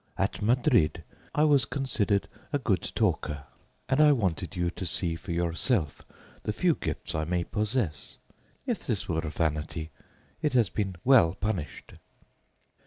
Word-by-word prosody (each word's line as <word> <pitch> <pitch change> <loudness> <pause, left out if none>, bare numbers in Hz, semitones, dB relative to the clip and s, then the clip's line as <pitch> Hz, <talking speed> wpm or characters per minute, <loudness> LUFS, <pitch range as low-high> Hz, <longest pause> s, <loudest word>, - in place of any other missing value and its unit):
At - - -1
Madrid 115 - +3 0.3
I 150 - +4
was 145 -3 +5
considered 110 -8 0 0.2
a 145 - +2
good 105 - 0
talker, 75 -1 0 0.4
and 130 +3 +3
I 150 -1 +7
wanted 95 - -1
you 90 -1 0
to 95 - -7
see 85 -1 0
for 90 +2 -7
yourself 85 - 0 0.4
the - - -2
few - - +2
gifts - - -4
I 80 - 0
may 90 +2 0
possess. 105 - -2 0.5
If 240 -10 -3
this 110 -7 -1
were 80 -2 0
vanity, 80 0 -2 0.5
it 150 -3 0
has 115 -9 +3
been 95 -2 -2
well 115 -11 +5
punished. 100 -7 -4
95 Hz, 145 wpm, -28 LUFS, 80-125 Hz, 0.5 s, I